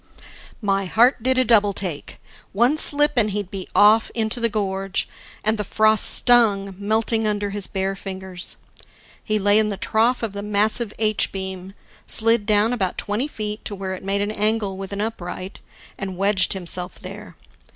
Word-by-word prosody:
My 195 Hz, -1 st, 0 dB
heart 235 Hz, +6 st, +3 dB
did 260 Hz, +2 st, 0 dB
a 255 Hz, -, +3 dB
double 210 Hz, -3 st, +3 dB
take; 180 Hz, -7 st, -6 dB, 0.3 s
one 240 Hz, +8 st, +3 dB
slip 295 Hz, -1 st, +5 dB
and 215 Hz, -3 st, +3 dB
he'd 205 Hz, -2 st, -4 dB
be 195 Hz, -2 st, -6 dB
off 215 Hz, +2 st, +5 dB
into 225 Hz, +1 st, 0 dB
the 230 Hz, 0 st, +1 dB
gorge, 195 Hz, -2 st, -2 dB, 0.4 s
and 215 Hz, 0 st, 0 dB
the -, -, 0 dB
frost 215 Hz, +2 st, +3 dB
stung, 210 Hz, -5 st, +3 dB
melting 220 Hz, +2 st, 0 dB
under 205 Hz, -1 st, -2 dB
his 205 Hz, -1 st, -2 dB
bare 195 Hz, 0 st, -2 dB
fingers. 190 Hz, -2 st, -5 dB, 0.7 s
He 215 Hz, -, 0 dB
lay 205 Hz, +1 st, +3 dB
in 215 Hz, -1 st, +1 dB
the 200 Hz, -, -4 dB
trough 230 Hz, +5 st, 0 dB
of 220 Hz, -3 st, -3 dB
the 200 Hz, -, -5 dB
massive 210 Hz, +2 st, 0 dB
H 215 Hz, -1 st, 0 dB
beam, 190 Hz, 0 st, -7 dB, 0.3 s
slid 225 Hz, -1 st, +4 dB
down 215 Hz, +2 st, +3 dB
about 190 Hz, -7 st, -2 dB
twenty 210 Hz, +7 st, -2 dB
feet 210 Hz, -6 st, -5 dB
to 205 Hz, -, -4 dB
where 190 Hz, -1 st, -5 dB
it 185 Hz, -, -8 dB
made 195 Hz, +1 st, -1 dB
an 205 Hz, +1 st, -2 dB
angle 215 Hz, -2 st, -1 dB
with 195 Hz, 0 st, -7 dB
an 200 Hz, 0 st, -3 dB
upright, 190 Hz, -3 st, -6 dB, 0.4 s
and 190 Hz, -2 st, -5 dB
wedged 195 Hz, -1 st, +1 dB
himself 180 Hz, -1 st, -5 dB
there. 200 Hz, +3 st, -10 dB
205 Hz, 175 wpm, -21 LUFS, 195-220 Hz, 0.7 s, slip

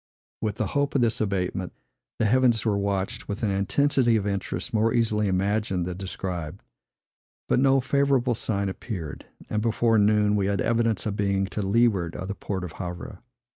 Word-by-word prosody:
With 105 Hz, -2 st, -1 dB
the 110 Hz, -, -1 dB
hope 140 Hz, +8 st, -1 dB
of 135 Hz, -, +3 dB
this 115 Hz, -2 st, +1 dB
abatement, 95 Hz, -3 st, -2 dB, 0.4 s
the 115 Hz, -, +1 dB
heavens 120 Hz, -1 st, +3 dB
were 105 Hz, -2 st, +2 dB
watched 100 Hz, +2 st, -2 dB
with 105 Hz, +3 st, -4 dB
an 105 Hz, -, +2 dB
intensity 120 Hz, +5 st, +2 dB
of 105 Hz, -3 st, 0 dB
interest 100 Hz, -2 st, -3 dB
more 110 Hz, +1 st, +3 dB
easily 110 Hz, -3 st, +2 dB
imagined 95 Hz, -1 st, 0 dB
than 90 Hz, 0 st, -4 dB
described; 90 Hz, -2 st, -5 dB, 0.8 s
but -, -, +2 dB
no 135 Hz, 0 st, +4 dB
favorable 135 Hz, -1 st, +2 dB
sign 100 Hz, -3 st, -1 dB
appeared; 90 Hz, -5 st, -6 dB, 0.2 s
and 105 Hz, -, 0 dB
before 115 Hz, 0 st, +2 dB
noon 105 Hz, 0 st, +3 dB
we 100 Hz, -2 st, +1 dB
had 100 Hz, -1 st, 0 dB
evidence 115 Hz, -1 st, +1 dB
of 105 Hz, -2 st, -2 dB
being 100 Hz, -2 st, +1 dB
to 100 Hz, +2 st, -4 dB
leeward 100 Hz, -4 st, +2 dB
of 95 Hz, -, -5 dB
the -, -, -1 dB
port 95 Hz, -2 st, -4 dB
of 90 Hz, -, -5 dB
Havre. 90 Hz, 0 st, -7 dB
105 Hz, 175 wpm, -26 LUFS, 95-115 Hz, 0.8 s, no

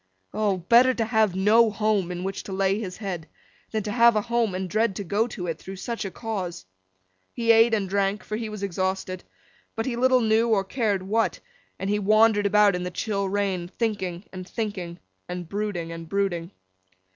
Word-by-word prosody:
O! 210 Hz, -3 st, +1 dB
Better 235 Hz, +8 st, +5 dB
to 225 Hz, -, 0 dB
have 220 Hz, -4 st, +2 dB
no 220 Hz, +4 st, +5 dB
home 210 Hz, -4 st, 0 dB
in 180 Hz, 0 st, -4 dB
which 195 Hz, +1 st, -3 dB
to -, -, -7 dB
lay 195 Hz, +1 st, +1 dB
his 190 Hz, -4 st, -6 dB
head, 180 Hz, -7 st, -5 dB, 0.4 s
than 220 Hz, -2 st, -2 dB
to 210 Hz, -, -3 dB
have 235 Hz, 0 st, +5 dB
a 215 Hz, -, +2 dB
home 235 Hz, -3 st, 0 dB
and 185 Hz, 0 st, -3 dB
dread 215 Hz, +2 st, +1 dB
to 200 Hz, -, -4 dB
go 205 Hz, +5 st, 0 dB
to 195 Hz, -6 st, -6 dB
it, 165 Hz, -2 st, -3 dB
through 190 Hz, -, -8 dB
such 230 Hz, +3 st, -4 dB
a -, -, -2 dB
cause. 190 Hz, -, -5 dB, 0.7 s
He 230 Hz, -1 st, +3 dB
ate 225 Hz, 0 st, +5 dB
and 200 Hz, -3 st, -1 dB
drank, 200 Hz, +1 st, 0 dB
for 215 Hz, -, -4 dB
he 220 Hz, 0 st, -4 dB
was 210 Hz, -1 st, -7 dB
exhausted—but 190 Hz, +3 st, -5 dB
he 255 Hz, -, -2 dB
little 255 Hz, +1 st, +4 dB
knew 225 Hz, +1 st, +3 dB
or 205 Hz, -3 st, +3 dB
cared 205 Hz, -2 st, -1 dB
what; 220 Hz, +4 st, 0 dB, 0.4 s
and 190 Hz, -, -4 dB
he 210 Hz, +1 st, +1 dB
wandered 215 Hz, 0 st, +4 dB
about 210 Hz, -1 st, +4 dB
in 180 Hz, -, -3 dB
the 180 Hz, -, -3 dB
chill 200 Hz, +1 st, -2 dB
rain, 195 Hz, -3 st, -1 dB
thinking 190 Hz, -3 st, -3 dB
and 185 Hz, 0 st, -8 dB
thinking, 190 Hz, -7 st, -4 dB, 0.3 s
and 180 Hz, -1 st, -5 dB
brooding 200 Hz, -4 st, -3 dB
and 165 Hz, -1 st, -8 dB
brooding. 190 Hz, -4 st, -1 dB
200 Hz, 195 wpm, -25 LUFS, 185-220 Hz, 0.7 s, Better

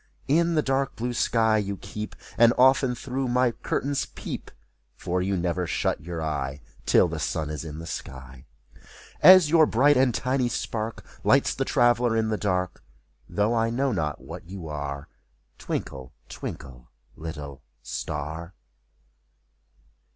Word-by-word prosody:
In 170 Hz, +4 st, +3 dB
the 155 Hz, -, +2 dB
dark 135 Hz, 0 st, 0 dB
blue 120 Hz, +2 st, -3 dB
sky 110 Hz, -2 st, +2 dB
you 100 Hz, -1 st, -3 dB
keep, 105 Hz, +3 st, -7 dB, 0.2 s
And 115 Hz, +1 st, +6 dB
often 130 Hz, 0 st, +4 dB
through 130 Hz, +2 st, -3 dB
my 125 Hz, 0 st, +2 dB
curtains 140 Hz, +4 st, -2 dB
peep. -, -, -7 dB, 0.5 s
For 90 Hz, +1 st, -2 dB
you 95 Hz, +1 st, 0 dB
never 90 Hz, 0 st, -1 dB
shut -, -, -1 dB
your 85 Hz, 0 st, -5 dB
eye 70 Hz, -3 st, -3 dB, 0.3 s
Till -, -, +5 dB
the -, -, -4 dB
sun 75 Hz, -1 st, -2 dB
is 75 Hz, -, -5 dB
in 75 Hz, -2 st, -7 dB
the 80 Hz, -, -7 dB
sky. 65 Hz, -3 st, -8 dB, 0.7 s
And 185 Hz, -3 st, +9 dB
your 160 Hz, 0 st, +5 dB
bright 140 Hz, +5 st, +4 dB
and 130 Hz, -1 st, +4 dB
tiny 125 Hz, +1 st, 0 dB
spark 115 Hz, -1 st, -4 dB, 0.2 s
Lights -, -, +4 dB
the -, -, -2 dB
traveler 120 Hz, -1 st, +3 dB
in 110 Hz, -1 st, +1 dB
the 110 Hz, -, 0 dB
dark; 90 Hz, -3 st, -2 dB, 0.5 s
Though 105 Hz, +3 st, +1 dB
I 115 Hz, -1 st, +2 dB
know 130 Hz, +3 st, 0 dB
not 75 Hz, -, -2 dB
what -, -, -10 dB
you 95 Hz, -4 st, -7 dB
are, 70 Hz, -2 st, -5 dB, 0.5 s
Twinkle, 65 Hz, -3 st, -5 dB, 0.2 s
twinkle, -, -, -8 dB, 0.3 s
little 75 Hz, -4 st, -7 dB, 0.2 s
star. 80 Hz, +4 st, -5 dB
105 Hz, 145 wpm, -26 LUFS, 80-125 Hz, 0.7 s, And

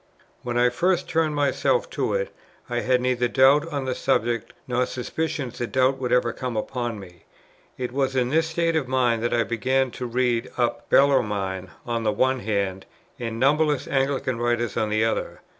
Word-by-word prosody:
When 120 Hz, -1 st, -3 dB
I 125 Hz, 0 st, +4 dB
first 175 Hz, +8 st, 0 dB
turned 160 Hz, -2 st, +1 dB
myself 145 Hz, -, +1 dB
to -, -, -1 dB
it, -, -, -2 dB, 0.3 s
I 120 Hz, -2 st, -1 dB
had 125 Hz, +1 st, +2 dB
neither 125 Hz, -1 st, +1 dB
doubt 135 Hz, +5 st, +4 dB
on 140 Hz, -2 st, -2 dB
the 130 Hz, -, -1 dB
subject, 115 Hz, -2 st, 0 dB, 0.2 s
nor 125 Hz, 0 st, +1 dB
suspicion 135 Hz, +1 st, -3 dB
that 120 Hz, 0 st, -5 dB
doubt 130 Hz, +1 st, +2 dB
would 125 Hz, -2 st, -2 dB
ever 125 Hz, -, +2 dB
come 125 Hz, -3 st, -4 dB
upon 120 Hz, -1 st, -3 dB
me. 90 Hz, -3 st, -14 dB, 0.5 s
It 125 Hz, -1 st, -3 dB
was 135 Hz, 0 st, 0 dB
in 125 Hz, -1 st, +1 dB
this 160 Hz, +3 st, +2 dB
state 165 Hz, 0 st, 0 dB
of 150 Hz, -5 st, 0 dB
mind 125 Hz, -3 st, +1 dB
that 120 Hz, -, 0 dB
I 120 Hz, -1 st, +2 dB
began 130 Hz, +3 st, 0 dB
to 125 Hz, -, -5 dB
read 120 Hz, 0 st, 0 dB
up 120 Hz, -1 st, -1 dB
Bellarmine 105 Hz, -9 st, +2 dB, 0.2 s
on 115 Hz, -1 st, -1 dB
the 110 Hz, -, +2 dB
one 130 Hz, +4 st, +1 dB
hand, 100 Hz, -4 st, -2 dB, 0.3 s
and 115 Hz, -2 st, -4 dB
numberless 150 Hz, +2 st, +2 dB
Anglican 135 Hz, -3 st, 0 dB
writers 120 Hz, -1 st, 0 dB
on 110 Hz, -, 0 dB
the 110 Hz, +1 st, +2 dB
other. 115 Hz, -, -2 dB
125 Hz, 185 wpm, -24 LUFS, 120-135 Hz, 0.5 s, I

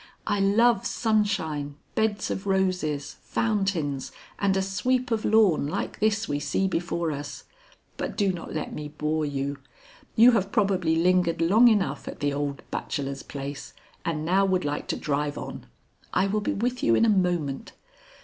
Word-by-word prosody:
"I 205 Hz, -, 0 dB
love 205 Hz, +2 st, +4 dB
sunshine, 190 Hz, -10 st, 0 dB, 0.2 s
beds 220 Hz, -1 st, 0 dB
of 195 Hz, +1 st, -4 dB
roses, 180 Hz, -7 st, 0 dB
fountains, 195 Hz, -, -1 dB, 0.3 s
and 195 Hz, -1 st, +2 dB
a -, -, +2 dB
sweep 250 Hz, +6 st, 0 dB
of 220 Hz, -1 st, 0 dB
lawn 205 Hz, -9 st, +4 dB
like 150 Hz, -, -3 dB
this 215 Hz, +1 st, +1 dB
we 145 Hz, 0 st, -1 dB
see 145 Hz, +7 st, 0 dB
before 170 Hz, -2 st, -1 dB
us. 145 Hz, 0 st, -6 dB, 0.5 s
But -, -, -4 dB
do 200 Hz, -3 st, +2 dB
not 170 Hz, -, -7 dB
let 155 Hz, -, -4 dB
me 150 Hz, -1 st, -5 dB
bore 150 Hz, +1 st, -1 dB
you. 140 Hz, 0 st, -3 dB, 0.6 s
You 235 Hz, +2 st, +8 dB
have 200 Hz, -4 st, 0 dB
probably 190 Hz, -7 st, +2 dB
lingered 175 Hz, 0 st, +2 dB
long 205 Hz, +9 st, +6 dB
enough 210 Hz, -4 st, +1 dB
at -, -, -7 dB
the 145 Hz, -1 st, 0 dB
old 140 Hz, -1 st, -3 dB
bachelor's 140 Hz, -1 st, -3 dB
place 140 Hz, 0 st, -7 dB, 0.3 s
and 155 Hz, -2 st, -2 dB
now 190 Hz, +4 st, +3 dB
would 185 Hz, -4 st, +1 dB
like 145 Hz, 0 st, -2 dB
to -, -, -1 dB
drive 145 Hz, 0 st, -1 dB
on. -, -, -7 dB, 0.4 s
I 190 Hz, -, +2 dB
will 210 Hz, +2 st, 0 dB
be -, -, -1 dB
with 245 Hz, +4 st, -1 dB
you 115 Hz, -, +4 dB
in -, -, +4 dB
a 210 Hz, -4 st, +4 dB
moment. 150 Hz, -6 st, -3 dB
180 Hz, 170 wpm, -26 LUFS, 145-205 Hz, 0.6 s, You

